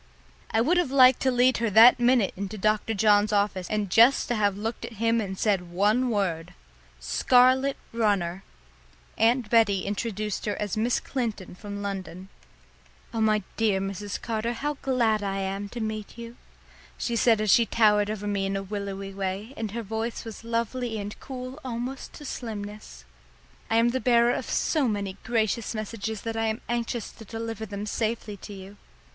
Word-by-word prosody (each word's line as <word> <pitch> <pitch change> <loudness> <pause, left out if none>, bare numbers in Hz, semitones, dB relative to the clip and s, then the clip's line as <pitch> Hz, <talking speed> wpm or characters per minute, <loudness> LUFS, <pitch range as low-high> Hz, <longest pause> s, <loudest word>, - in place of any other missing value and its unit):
I 225 - +2
would 335 +9 +2
have 350 -6 +1
liked 255 -2 +6
to 260 - +2
lead 250 0 +3
her 230 -1 0
that 230 +4 +8
minute 240 -4 +3
into 200 +2 -5
Dr. 215 +2 0
John's 205 0 +4
office 200 -3 0
and 210 -1 -1
just 235 +7 +5
to 240 - +1
have 205 -2 +1
looked 225 +3 -4
at - - -6
him 230 +1 +1
and 190 -2 -5
said 190 -5 0
one 210 +8 +2
word 185 -7 -2 0.4
"Scarlet 255 - +3 0.2
runner!" 195 -5 0 0.8
Aunt 230 0 +2
Betty 215 -5 +4
introduced 210 0 -3
her 205 - 0
as 210 0 -2
Miss 230 +3 +1
Clinton 225 -9 -4
from 205 +2 -7
London. 190 -2 -6 0.8
"Oh, 225 - -1
my 215 -2 +2
dear 215 -4 +2
Mrs. 195 +1 -4
Carter, 230 0 -2
how 295 +5 -2
glad 235 -5 +1
I 195 -1 -2
am 195 +1 -3
to 240 - -7
meet 215 -1 -5
you!" 235 0 -8 0.6
she 235 - -2
said 230 -1 +4
as 215 -2 +2
she 230 +2 +5
towered 210 -2 +3
over 210 -1 -4
me 200 -1 -1
in 195 - -2
a 195 - -2
willowy 195 -1 -5
way, 195 +5 -4
and 220 -1 -4
her 230 +3 -5
voice 225 +3 -4
was 225 0 -8
lovely 230 0 -2
and 205 0 -5
cool 255 +1 -7
almost 250 +1 -5
to 295 - -10
slimness. 210 -5 -7 0.6
"I 225 - +1
am 230 +1 +4
the 260 +2 -1
bearer 240 -1 +4
of - - -4
so 300 -5 +1
many 200 -3 -3
gracious 225 0 -1
messages 215 0 -4
that 225 0 -4
I 225 0 0
am 220 0 -2
anxious 235 -1 -2
to 225 - -13
deliver 225 0 -5
them 200 0 -5
safely 215 0 -2
to 200 - -10
you. 195 +1 -10
220 Hz, 180 wpm, -26 LUFS, 200-235 Hz, 0.8 s, that